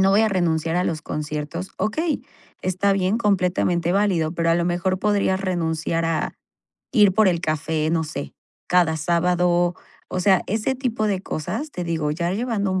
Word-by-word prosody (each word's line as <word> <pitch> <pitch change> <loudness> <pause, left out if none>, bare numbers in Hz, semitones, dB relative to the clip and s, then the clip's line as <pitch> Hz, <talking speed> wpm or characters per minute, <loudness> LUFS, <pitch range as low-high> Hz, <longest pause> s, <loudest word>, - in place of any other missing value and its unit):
no 190 0 +4
voy 200 +2 +5
a 220 - +3
renunciar 165 -3 0
a 180 - +1
los 155 -4 -2
conciertos", 150 +4 -4
okey, 300 - -1 0.4
está 185 +2 +1
bien, 195 +3 +1
completamente 180 -4 +1
válido, 190 -6 +2
pero 170 -1 0
a - - +4
lo 170 - +1
mejor 180 +2 0
podrías 200 -2 +1
renunciar 165 -3 -1
a 165 -1 -1 0.6
ir 210 -6 +5
por 215 +2 +4
el 170 -2 +1
café, 155 -1 -1
no 165 -1 +1
sé, 150 - -6 0.4
cada 175 -3 +3
sábado. 175 +2 +2 0.3
O 185 - -2
sea, 190 0 +4
ese 220 +6 0
tipo 240 -4 -1
de 195 -3 0
cosas, 270 - -4
te 180 - -4
digo, 160 -3 -1
ya 170 +3 -1
llevando 210 -2 -1
un 185 - 0
180 Hz, 180 wpm, -23 LUFS, 165-200 Hz, 0.6 s, voy